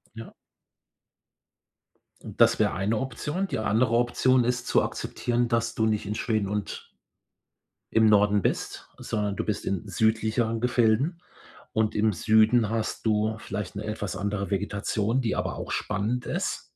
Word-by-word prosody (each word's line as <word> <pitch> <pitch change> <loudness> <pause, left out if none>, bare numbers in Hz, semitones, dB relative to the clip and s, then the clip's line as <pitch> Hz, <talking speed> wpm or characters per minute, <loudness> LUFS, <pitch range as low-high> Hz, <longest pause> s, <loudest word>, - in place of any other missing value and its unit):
Ja. 115 0 -9 1.9
Und - - -5
das - - +6
wäre - - +2
eine 100 +4 0
Option. 150 +9 -3
Die - - -3
andere 110 +2 +1
Option 120 +1 +3
ist 125 0 -1
zu - - +3
akzeptieren, 120 0 -2
dass 115 0 0
du 110 - +1
nicht 105 -2 0
in 105 - -3
Schweden 110 -3 -1
und 105 -1 -4 1.0
im 110 0 +5
Norden 105 -1 +4
bist, - - -3
sondern 105 -2 -2
du - - -2
bist 105 - -2
in 100 +1 -2
südlicheren 110 +3 +1
Gefilden 125 +7 +1 0.5
und 110 -1 +1
im 105 0 +2
Süden 110 +3 +3
hast 115 0 -3
du 110 0 +1
vielleicht 105 -3 -6
'ne 100 - -4
etwas 105 -3 -4
andere 100 0 -2
Vegetation, 105 +4 -1
die 115 -3 -1
aber - - -2
auch - - -6
spannend 105 +5 -2
ist. - - -2
110 Hz, 150 wpm, -26 LUFS, 105-120 Hz, 1.9 s, das